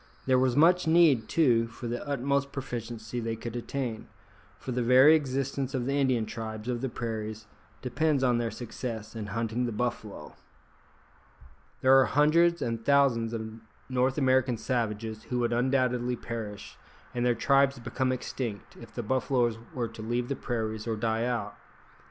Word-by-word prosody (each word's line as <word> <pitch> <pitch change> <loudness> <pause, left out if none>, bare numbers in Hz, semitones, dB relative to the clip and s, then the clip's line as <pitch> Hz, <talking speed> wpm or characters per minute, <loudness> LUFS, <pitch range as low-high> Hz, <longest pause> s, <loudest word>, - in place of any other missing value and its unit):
There 130 -1 +4
was 130 -1 +2
much 175 +4 +4
need, 160 -9 +4
too, 120 -8 +3
for 120 +1 -10
the 120 +1 -3
utmost 140 0 0
proficiency 120 -3 -5
they 115 -1 -2
could 115 +1 -7
attain, 120 -2 -4 0.5
for 130 - -6
the 125 0 -1
very 130 +5 +7
existence 135 -2 -1
of 125 -2 -1
the 135 - -1
Indian 130 -5 +2
tribes 110 0 -6
of 120 -1 -2
the 135 - -1
prairies 110 -2 -5 0.4
depends 140 +2 +1
on 120 -2 +3
their 115 -1 -1
success 115 -2 -6
in 110 -2 -5
hunting 115 +3 -1
the - - -3
buffalo. 110 -2 -4 1.5
There 130 +1 +6
are 130 - +5
hundreds 155 +8 +3
and 115 -1 -3
thousands 135 -5 +3
of 110 -1 -6 0.3
North 130 +1 +1
American 130 -3 +2
savages 110 -3 -3
who 125 - -3
would 120 -1 +1
undoubtedly 125 0 +1
perish, 110 -4 -7 0.4
and 120 -1 -1
their 120 -1 +3
tribes 140 0 +3
become 130 +2 -1
extinct, 120 -5 -5
if - - -13
the - - -3
buffaloes 120 -1 +1
were 120 -2 -2
to 110 - -10
leave 120 +2 -2
the 140 - -1
prairies 110 -3 -3
or 115 - 0
die 110 +1 0
out. 115 -4 -2
120 Hz, 165 wpm, -28 LUFS, 115-130 Hz, 1.5 s, very